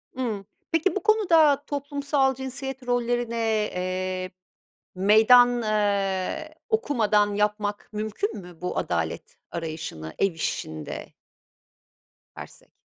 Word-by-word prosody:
Imm. 230 -6 -2 0.3
Peki, 330 +2 +2
bu 405 - -2
konuda 330 -10 +4
toplumsal 280 -1 0
cinsiyet 265 0 -6
rollerine, 240 -1 0 0.4
eee, 185 0 -2 0.6
meydan, 230 +5 +6
aaa, 200 -3 0 0.2
okumadan 220 - +2
yapmak 210 0 -1
mümkün 215 - -3
mü 175 -3 -12
bu 180 - -3
adalet 85 -2 -3
arayışını 155 - -5
ev 195 - +2
işinde? 80 - -4 1.3
Dersek. - - -11
215 Hz, 95 wpm, -25 LUFS, 185-270 Hz, 1.3 s, meydan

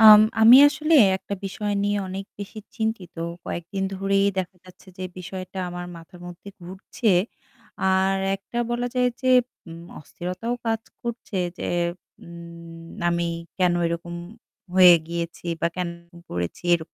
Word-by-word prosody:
আম 215 -1 +11 0.2
আমি 230 +3 +10
আসলে 305 +2 +1 0.2
একটা 190 +1 -6
বিষয় 205 +2 -3
নিয়ে 205 0 +1
অনেক 190 +1 -5
বেশি 205 +2 -7 0.2
চিন্তিত। 220 -6 -3 0.3
কয়েকদিন 175 +3 -4
ধরেই 195 +1 +2
দেখা 185 0 -3
যাচ্ছে 185 +1 -17
যে 185 - -4
বিষয়টা 185 +1 -7
আমার 175 0 -6
মাথার 165 +2 -14
মধ্যে 175 +3 -10
ঘুরছে। 190 +5 -4 0.8
আর 190 +1 +2 0.2
একটা 200 +4 -7
বলা 240 +1 -1
যায় 250 0 +3
যে 255 - 0 0.4
উম 165 0 -9 0.2
অস্থিরতাও 180 +9 -4
কাজ 225 -1 +1 0.2
করছে 235 -4 -5 0.2
যে, - - -4 0.6
উম 170 -1 -11 0.2
আমি 170 0 0 0.3
কেন 180 -1 +3
এরকম 170 +1 -4 0.6
হয়ে 180 -2 +9
গিয়েছি 170 +1 -5
বা - - +2
কেন 180 -1 -1
এরকম 170 0 -17
করেছি। 90 0 -4
এর 170 - -1
185 Hz, 140 wpm, -24 LUFS, 170-205 Hz, 0.8 s, আম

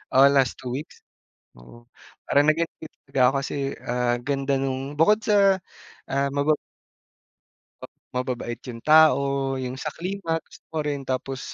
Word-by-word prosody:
oh, 135 +1 +8
last 135 -3 +3
2 125 -1 -6
weeks. 150 +4 -8 0.6
Oo, 120 - -16 0.4
parang 145 +1 +3
nag-enjoy 160 0 -3 0.2
talaga 130 - -2
ako - - -6
kasi, - - -5 0.3
ah, 120 0 +1
ganda 140 +1 -1
nung 135 +1 -3
bukod 210 +7 +5
sa, 200 -2 +4 0.5
ah, 140 +1 +1
maba 145 +1 +2 1.2
pa - - -6 0.3
mababait 125 -2 -3
yung 115 -1 -8
tao. 155 -2 +6 0.4
Yung 130 +1 -5
sa 155 +2 -5
klima 185 -1 -4
gusto - - -17
ko - - -2
rin, 140 -1 -2
tapos 130 0 -3
140 Hz, 145 wpm, -24 LUFS, 130-155 Hz, 1.2 s, oh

